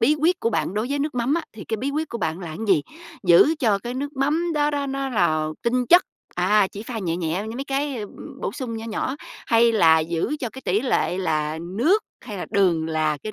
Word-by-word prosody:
bí 290 Hz, +7 st, +4 dB
quyết 350 Hz, +3 st, +2 dB
của 230 Hz, -, +1 dB
bạn 205 Hz, -, -1 dB
đối 215 Hz, +3 st, -1 dB
với 285 Hz, -, 0 dB
nước 295 Hz, -1 st, -2 dB
mắm 250 Hz, +5 st, +1 dB
á 335 Hz, -, 0 dB
thì 215 Hz, -, -9 dB
cái 220 Hz, -, -2 dB
bí 270 Hz, +5 st, -2 dB
quyết 310 Hz, +2 st, -2 dB
của 235 Hz, -, -5 dB
bạn 160 Hz, +1 st, -2 dB
là 175 Hz, -, -6 dB
cái 155 Hz, -, -7 dB
gì? 165 Hz, -7 st, +4 dB, 0.4 s
Giữ 185 Hz, -, +6 dB
cho 215 Hz, -8 st, +2 dB
cái 240 Hz, +4 st, -6 dB
nước 285 Hz, +2 st, -4 dB
mắm 310 Hz, +6 st, +1 dB
đó 295 Hz, 0 st, +2 dB
đó 285 Hz, -1 st, -2 dB
nó 275 Hz, 0 st, -2 dB
là 155 Hz, -10 st, +1 dB
tinh 250 Hz, +1 st, +1 dB
chất, 350 Hz, +8 st, +7 dB, 0.3 s
à, 195 Hz, +3 st, +3 dB
chỉ 205 Hz, -, -7 dB
pha 230 Hz, -1 st, -5 dB
nhẹ 170 Hz, -4 st, -2 dB
nhẹ 175 Hz, +3 st, -2 dB
với 225 Hz, +2 st, -6 dB
mấy 275 Hz, -, -4 dB
cái, 280 Hz, 0 st, -1 dB
ưm, 210 Hz, -2 st, -9 dB
bổ -, -, -2 dB
sung 235 Hz, -5 st, -5 dB
nhỏ 225 Hz, -, -6 dB
nhỏ, 230 Hz, +4 st, -2 dB, 0.3 s
hay 230 Hz, 0 st, +4 dB
là 165 Hz, -7 st, +5 dB
giữ 170 Hz, -, -1 dB
cho 245 Hz, -, -2 dB
cái 265 Hz, +2 st, -11 dB
tỷ 195 Hz, +4 st, +2 dB
lệ 215 Hz, -7 st, 0 dB
là 155 Hz, -3 st, -1 dB
nước 235 Hz, -, +1 dB, 0.2 s
hay 210 Hz, -5 st, -8 dB
là -, -, -4 dB
đường 180 Hz, -6 st, +2 dB
là 155 Hz, -1 st, 0 dB
cái 215 Hz, -, -5 dB
225 Hz, 250 wpm, -23 LUFS, 180-275 Hz, 0.4 s, chất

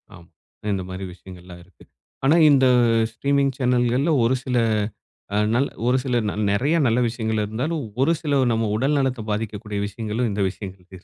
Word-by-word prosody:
ஆமா. 85 Hz, -2 st, -15 dB, 0.5 s
இந்த 95 Hz, -1 st, -2 dB
மாதிரி 95 Hz, +1 st, -6 dB
விஷயங்கள்லாம் 90 Hz, -1 st, -13 dB
இருக்கு. 90 Hz, -1 st, -21 dB, 0.4 s
ஆனா, 145 Hz, +4 st, +5 dB
இந்த 135 Hz, -2 st, +5 dB, 0.5 s
ஸ்ட்ரீமிங் 140 Hz, +3 st, 0 dB
சேனல்கள்ல 125 Hz, +3 st, +1 dB
ஒரு 120 Hz, +3 st, +2 dB
சில, 125 Hz, -1 st, -1 dB, 1.3 s
ஒரு 125 Hz, +1 st, +3 dB
சில 125 Hz, -3 st, 0 dB
நல் 105 Hz, 0 st, -2 dB
நெறைய 135 Hz, +11 st, +1 dB
நல்ல 115 Hz, +1 st, +2 dB
விஷயங்கள் 110 Hz, -2 st, -2 dB
இருந்தாலும், 135 Hz, +9 st, -3 dB, 0.2 s
ஒரு 165 Hz, +4 st, +3 dB
சில 145 Hz, -4 st, +1 dB
நம் 110 Hz, -2 st, 0 dB
உடல் 140 Hz, +5 st, +1 dB
நலத்தை 130 Hz, -4 st, -1 dB
பாதிக்கக்கூடிய 105 Hz, -1 st, -4 dB
விஷயங்களும் 110 Hz, +3 st, -3 dB
இந்த 100 Hz, 0 st, -1 dB
விஷயங்கள் 95 Hz, -1 st, -9 dB
இருக்குது 95 Hz, 0 st, -14 dB
115 Hz, 150 wpm, -22 LUFS, 100-135 Hz, 1.3 s, ஆனா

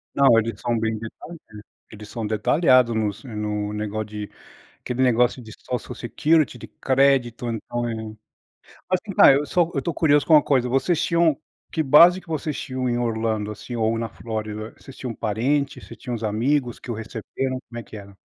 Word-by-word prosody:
Não, 135 Hz, -5 st, +6 dB
eles 115 Hz, -2 st, -4 dB
são 120 Hz, -1 st, 0 dB
bem 110 Hz, 0 st, -1 dB
detalhistas, 115 Hz, +1 st, -10 dB, 0.3 s
eles 105 Hz, 0 st, -10 dB
são 115 Hz, -1 st, -5 dB
detalhados 120 Hz, +3 st, +3 dB
nos 105 Hz, -2 st, -2 dB
no 105 Hz, -3 st, -3 dB
negócio 105 Hz, 0 st, -3 dB
de 105 Hz, -1 st, -7 dB, 0.5 s
aquele 125 Hz, +1 st, -4 dB
negócio 125 Hz, 0 st, +3 dB
de 110 Hz, -2 st, -11 dB
Social 125 Hz, 0 st, -5 dB
Security 150 Hz, +7 st, +1 dB
de -, -, -9 dB
crédito, 130 Hz, -3 st, +1 dB
então 120 Hz, +1 st, -3 dB
é 115 Hz, -, -3 dB
Mas 110 Hz, -1 st, -7 dB, 0.9 s
assim, 205 Hz, -, -6 dB
vai, -, -, +8 dB
eu 145 Hz, -, 0 dB
só 175 Hz, +2 st, +1 dB
eu 140 Hz, -, -1 dB
tô 170 Hz, -, -2 dB
curioso 150 Hz, -2 st, +3 dB
com 160 Hz, -, +4 dB
uma 150 Hz, -, +8 dB
coisa. 130 Hz, -3 st, +1 dB
Vocês 135 Hz, +7 st, +1 dB
tinham 170 Hz, -3 st, +2 dB, 0.4 s
que 160 Hz, -, 0 dB
base 170 Hz, +6 st, +7 dB
que -, -, -23 dB
vocês 155 Hz, -1 st, -3 dB
tinham 130 Hz, -1 st, -3 dB
em 120 Hz, -, 0 dB
Orlando, 110 Hz, -3 st, -1 dB
assim, 105 Hz, +3 st, -8 dB
ou 115 Hz, 0 st, 0 dB
na 115 Hz, 0 st, -3 dB
Flórida? 110 Hz, -1 st, -6 dB
Vocês 135 Hz, -, -13 dB
tinham 125 Hz, -3 st, -5 dB
parente, 130 Hz, +7 st, -1 dB
vocês -, -, -12 dB
tinham 125 Hz, -3 st, -5 dB
uns 115 Hz, -, -6 dB
amigos 120 Hz, +4 st, 0 dB
que -, -, -9 dB
o -, -, -4 dB
receberam? 115 Hz, +4 st, -4 dB
Como 120 Hz, 0 st, -7 dB
é -, -, -9 dB
que 110 Hz, -, -12 dB
era? 100 Hz, -1 st, -12 dB
120 Hz, 195 wpm, -23 LUFS, 110-140 Hz, 0.9 s, vai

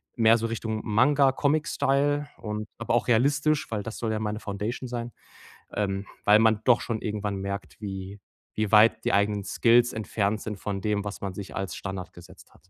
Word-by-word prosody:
mehr 115 Hz, 0 st, +5 dB
so 115 Hz, -, -2 dB
Richtung 110 Hz, -1 st, -3 dB
Manga, 135 Hz, +5 st, +4 dB
Comic 150 Hz, +2 st, +1 dB
Style 145 Hz, +1 st, +1 dB
und 105 Hz, 0 st, -5 dB
aber 115 Hz, 0 st, -1 dB
auch 120 Hz, -, +1 dB
realistisch, 145 Hz, +5 st, +2 dB
weil 105 Hz, -2 st, -2 dB
das 115 Hz, -, -6 dB
soll 115 Hz, -2 st, -1 dB
ja 110 Hz, -, -1 dB
meine 105 Hz, 0 st, -3 dB
Foundation 105 Hz, +5 st, -4 dB
sein, 120 Hz, -1 st, -4 dB, 0.6 s
ähm, 100 Hz, -1 st, -2 dB, 0.2 s
weil 105 Hz, +1 st, +7 dB
man 110 Hz, -1 st, +3 dB
doch 125 Hz, -2 st, +5 dB
schon 115 Hz, -2 st, -3 dB
irgendwann 105 Hz, -1 st, -3 dB
merkt, 100 Hz, +2 st, -6 dB
wie 95 Hz, 0 st, -6 dB, 0.4 s
wie 110 Hz, -2 st, -1 dB
weit 110 Hz, +1 st, +6 dB
die -, -, +2 dB
eigenen 100 Hz, 0 st, +2 dB
Skills 120 Hz, +4 st, +3 dB
entfernt 105 Hz, -1 st, -1 dB
sind 105 Hz, -2 st, -5 dB
von 100 Hz, -2 st, -3 dB
dem, 105 Hz, -1 st, 0 dB
was 100 Hz, -, -5 dB
man 95 Hz, -2 st, -4 dB
sich 100 Hz, 0 st, -8 dB
als 95 Hz, -4 st, -3 dB
Standard 95 Hz, -2 st, -6 dB
gesetzt 85 Hz, -, -15 dB
hat. 90 Hz, -, -25 dB
110 Hz, 195 wpm, -26 LUFS, 100-120 Hz, 0.6 s, weil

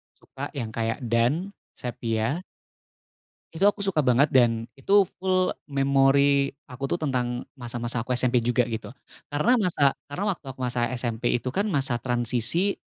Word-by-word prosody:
suka -, -, -8 dB
yang 115 Hz, -5 st, -4 dB
kayak 115 Hz, +3 st, -2 dB
"Dan", 120 Hz, -, +1 dB, 0.2 s
"Sephia". 115 Hz, +5 st, -2 dB, 1.1 s
Itu 165 Hz, +4 st, +1 dB
aku 205 Hz, 0 st, +3 dB
suka 195 Hz, -6 st, +2 dB
banget, 130 Hz, +4 st, +4 dB
dan 115 Hz, -2 st, +2 dB
itu 195 Hz, +8 st, +4 dB
full 185 Hz, -1 st, +1 dB, 0.2 s
memori 140 Hz, 0 st, +3 dB, 0.2 s
aku, 130 Hz, +1 st, -9 dB
tuh, 175 Hz, -, -2 dB
tentang 125 Hz, -4 st, -1 dB, 0.2 s
masa-masa 120 Hz, -1 st, -3 dB
aku 125 Hz, -, -1 dB
SMP 125 Hz, 0 st, +2 dB
juga, 120 Hz, +1 st, +3 dB
gitu, 115 Hz, +1 st, -5 dB, 0.4 s
karena 205 Hz, +13 st, +3 dB
masa 165 Hz, -, +2 dB
karena 145 Hz, +8 st, -5 dB
waktu 160 Hz, -, -20 dB
aku 130 Hz, -, -24 dB
masa 125 Hz, -1 st, -1 dB, 0.2 s
SMP 120 Hz, -1 st, -3 dB
itu, 125 Hz, +1 st, -1 dB
kan, 200 Hz, +10 st, -1 dB
masa 135 Hz, -, 0 dB
transisi, 125 Hz, -, +1 dB
130 Hz, 150 wpm, -25 LUFS, 120-155 Hz, 1.1 s, banget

